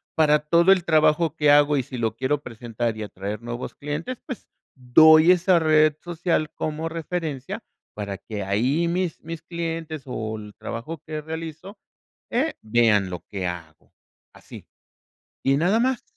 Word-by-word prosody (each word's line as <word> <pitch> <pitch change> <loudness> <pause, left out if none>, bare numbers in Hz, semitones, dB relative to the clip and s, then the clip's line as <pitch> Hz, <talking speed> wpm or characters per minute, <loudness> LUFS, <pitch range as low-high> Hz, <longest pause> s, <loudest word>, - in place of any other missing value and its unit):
Para 150 -1 +4
todo 170 +5 +4
el 190 -2 +4
trabajo 155 -1 +3
que 150 -2 +4
hago 145 0 +5
y 135 - 0
si 125 - -8
lo 110 -1 -1
quiero 135 +4 -1
presentar 115 -2 -4
y 110 - -4
atraer 100 0 -5
nuevos 120 +1 -6
clientes, 150 - -5
pues, 255 -6 -8 0.3
doy 155 +6 +7
esa 180 0 +4
red 155 -1 +4
social 170 -2 -1
como 155 +1 -3
referencia 160 -4 -4 0.3
para 100 -2 -5
que 105 -1 -6
ahí 125 - +1
mis 175 -1 -2
mis 165 0 -7
clientes, 165 -2 -4
o 110 -3 -4
el 105 -1 -11
trabajo 120 +12 -6
que 155 -1 -5
realizo, 160 +5 -7 0.5
eh, 275 +7 0
vean 110 -4 +3
lo 90 -2 -7
que 95 -2 -4
hago 85 -3 -9 0.4
así, - - -13 0.8
¿y 135 +1 +3
nada 180 +8 +2
más? 255 0 0
150 Hz, 155 wpm, -24 LUFS, 115-165 Hz, 0.8 s, doy